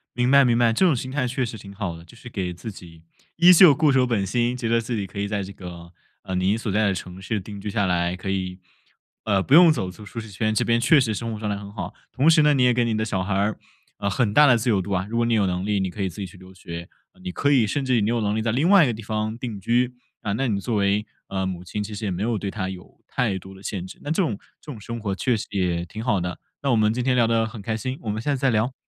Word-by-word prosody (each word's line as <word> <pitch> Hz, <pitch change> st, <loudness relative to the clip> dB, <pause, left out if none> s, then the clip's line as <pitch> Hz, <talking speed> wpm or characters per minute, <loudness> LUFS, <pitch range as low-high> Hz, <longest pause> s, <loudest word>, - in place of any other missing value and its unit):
明 125 Hz, 0 st, +1 dB
白 140 Hz, 0 st, +7 dB
明 120 Hz, -2 st, +3 dB
白， 120 Hz, -1 st, +3 dB
这 190 Hz, -, +3 dB
种 165 Hz, -6 st, +4 dB
心 130 Hz, +1 st, -5 dB
态 135 Hz, -2 st, 0 dB
确 130 Hz, +1 st, -1 dB
实 115 Hz, -1 st, -6 dB
挺 100 Hz, -1 st, -11 dB
好 100 Hz, -4 st, -4 dB
的。 85 Hz, -, -13 dB
就 85 Hz, -, -17 dB
是 125 Hz, +1 st, -11 dB
给 95 Hz, -6 st, -3 dB
自 110 Hz, +6 st, -7 dB
己 85 Hz, -4 st, -13 dB, 0.4 s
依 175 Hz, +2 st, +8 dB
旧 175 Hz, -3 st, +8 dB
固 150 Hz, +1 st, +3 dB
守 130 Hz, -1 st, +4 dB
本 110 Hz, -5 st, 0 dB
心， 120 Hz, +4 st, 0 dB
觉 120 Hz, -2 st, -3 dB
得 115 Hz, 0 st, +3 dB
自 115 Hz, +1 st, -3 dB
己 100 Hz, -3 st, -2 dB
可 100 Hz, -, -8 dB
以 100 Hz, -, -1 dB
在 100 Hz, -1 st, -2 dB
这 100 Hz, +1 st, -8 dB
个， 85 Hz, -3 st, -10 dB, 0.3 s
呃， 95 Hz, -, -4 dB
您 95 Hz, +4 st, +1 dB
所 115 Hz, -2 st, -3 dB
在 105 Hz, +1 st, +2 dB
的 95 Hz, -, +1 dB
城 90 Hz, +1 st, -8 dB
市 105 Hz, +2 st, -2 dB
定 100 Hz, +1 st, -9 dB
居 105 Hz, -, -4 dB
下 100 Hz, 0 st, 0 dB
来， 90 Hz, -1 st, 0 dB
可 95 Hz, +1 st, -6 dB
以， 95 Hz, -1 st, -3 dB, 0.7 s
呃， 100 Hz, -3 st, +2 dB
不 135 Hz, -, 0 dB
用 170 Hz, +1 st, +9 dB
走 95 Hz, -11 st, -2 dB
出 105 Hz, +3 st, -13 dB
舒 115 Hz, -, -7 dB
适 115 Hz, -1 st, -8 dB
圈， 110 Hz, +2 st, -1 dB
这 110 Hz, -, +1 dB
边 115 Hz, 0 st, +2 dB
确 130 Hz, +6 st, +5 dB
实 115 Hz, -5 st, +1 dB
生 115 Hz, +3 st, -4 dB
活 105 Hz, -, -6 dB
状 105 Hz, -1 st, -3 dB
态 100 Hz, -, -2 dB
很 100 Hz, 0 st, -9 dB
好。 100 Hz, -4 st, -6 dB, 0.2 s
同 140 Hz, +5 st, +3 dB
时 160 Hz, -1 st, +6 dB
呢， 150 Hz, 0 st, +5 dB
你 135 Hz, -3 st, +3 dB
也 125 Hz, 0 st, +5 dB
给 120 Hz, 0 st, +2 dB
你 115 Hz, -2 st, 0 dB
的 110 Hz, -, 0 dB
小 95 Hz, -4 st, -1 dB
孩 95 Hz, +1 st, -2 dB
儿， 100 Hz, +2 st, 0 dB, 0.4 s
呃， 100 Hz, -, 0 dB
很 105 Hz, +2 st, 0 dB
大 150 Hz, +4 st, +7 dB
的 125 Hz, -3 st, +6 dB
自 115 Hz, +2 st, -1 dB
由 100 Hz, -4 st, +3 dB
度 100 Hz, +2 st, -6 dB
啊。 95 Hz, -1 st, 0 dB
如 115 Hz, -, -2 dB
果 120 Hz, -, +2 dB
你 115 Hz, -, +1 dB
有 105 Hz, -3 st, +3 dB
能 90 Hz, 0 st, -2 dB
力， 105 Hz, -1 st, +1 dB
你 95 Hz, -1 st, -1 dB
可 100 Hz, -, -7 dB
以 95 Hz, -, 0 dB
自 90 Hz, -, -13 dB
己 100 Hz, -, -3 dB
去 95 Hz, +1 st, -15 dB
留 95 Hz, +1 st, -14 dB
学， 85 Hz, -1 st, -8 dB, 0.3 s
你 185 Hz, -, -4 dB
可 145 Hz, -4 st, +1 dB
以 125 Hz, -6 st, +4 dB
甚 140 Hz, +6 st, -1 dB
至 130 Hz, -1 st, +2 dB
于 115 Hz, -, +3 dB
你 105 Hz, -, +1 dB
有 120 Hz, 0 st, +1 dB
能 105 Hz, 0 st, 0 dB
力 110 Hz, -, 0 dB
在 115 Hz, 0 st, 0 dB
另 140 Hz, +10 st, +2 dB
外 200 Hz, -3 st, +7 dB
一 140 Hz, -, +3 dB
个 120 Hz, -, 0 dB
地 110 Hz, -, -8 dB
方 110 Hz, +1 st, -2 dB
定 115 Hz, -5 st, -5 dB
居， 120 Hz, +5 st, +1 dB, 0.3 s
啊， 100 Hz, -, -2 dB
那 130 Hz, +6 st, 0 dB
你 105 Hz, -4 st, 0 dB
作 115 Hz, +3 st, -2 dB
为， 100 Hz, +1 st, +1 dB, 0.2 s
呃， 95 Hz, -1 st, -2 dB
母 90 Hz, -2 st, -4 dB
亲 105 Hz, +4 st, -4 dB
其 105 Hz, +1 st, -7 dB
实 105 Hz, +1 st, -5 dB
也 100 Hz, -, -1 dB
没 90 Hz, +3 st, -2 dB
有 115 Hz, -1 st, 0 dB
对 100 Hz, -, -3 dB
他 95 Hz, -1 st, -3 dB
有 90 Hz, -1 st, -11 dB
太 110 Hz, -6 st, -1 dB
多 95 Hz, +1 st, -11 dB
的 95 Hz, -, -14 dB
限 95 Hz, -2 st, -4 dB
制。 95 Hz, -, -11 dB
那 145 Hz, -, -6 dB
这 175 Hz, +4 st, +2 dB
种 110 Hz, -, -2 dB, 0.2 s
这 150 Hz, -, -10 dB
种 110 Hz, -6 st, -9 dB
生 115 Hz, +3 st, -6 dB
活 105 Hz, -3 st, -2 dB
确 120 Hz, +3 st, +1 dB
实 -, -, -5 dB
也 90 Hz, -4 st, 0 dB
挺 110 Hz, +5 st, -7 dB
好 115 Hz, -5 st, +1 dB
的。 90 Hz, 0 st, -4 dB, 0.2 s
那 140 Hz, -, +1 dB
我 -, -, +4 dB
们 110 Hz, -1 st, +3 dB
今 125 Hz, +1 st, -2 dB
天 130 Hz, -1 st, +2 dB
聊 120 Hz, -2 st, +4 dB
得 115 Hz, 0 st, +2 dB
很 110 Hz, -1 st, -8 dB
开 110 Hz, +2 st, -2 dB
心， 130 Hz, +3 st, -4 dB
我 110 Hz, -, -5 dB
们 105 Hz, +1 st, -2 dB
下 145 Hz, +5 st, 0 dB
次 -, -, -5 dB
再 135 Hz, -, +2 dB
聊。 115 Hz, +2 st, +1 dB
110 Hz, 345 characters per minute, -24 LUFS, 95-120 Hz, 0.7 s, 用